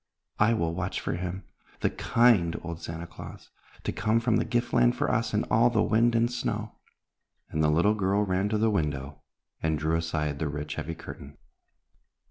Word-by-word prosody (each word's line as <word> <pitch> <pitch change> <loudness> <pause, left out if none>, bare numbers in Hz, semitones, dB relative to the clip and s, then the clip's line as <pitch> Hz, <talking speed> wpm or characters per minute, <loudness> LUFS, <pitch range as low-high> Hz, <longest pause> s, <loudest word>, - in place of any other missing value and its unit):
I 115 +2 +4
will 85 -5 -1
watch 90 +2 -2
for - - -3
him, 90 +2 -4 0.4
the - - +2
kind 115 -9 +3
old 85 -1 -6
Santa 85 +1 -6
Claus, 85 - -11 0.3
to - - -1
come 110 +4 +1
from 115 -1 +2
the - - 0
gift 120 0 -1
land - - +4
for - - 0
us - - 0
in - - +1
all 115 +2 +5
the 115 -3 +2
wind 115 +1 +3
and 115 +1 +2
snow," 110 -3 -3 0.7
and 80 - 0
the 75 - +4
little 85 +7 +3
girl 100 0 +1
ran 95 +1 0
to 110 - +1
the 110 +1 +2
window 70 -7 -2 0.4
and 80 -1 +1
drew 80 +2 0
aside 75 -3 -1
the 80 - -1
rich, 75 +1 -4
heavy 80 +1 -4
curtain. 70 -3 -10
90 Hz, 190 wpm, -28 LUFS, 80-110 Hz, 0.7 s, all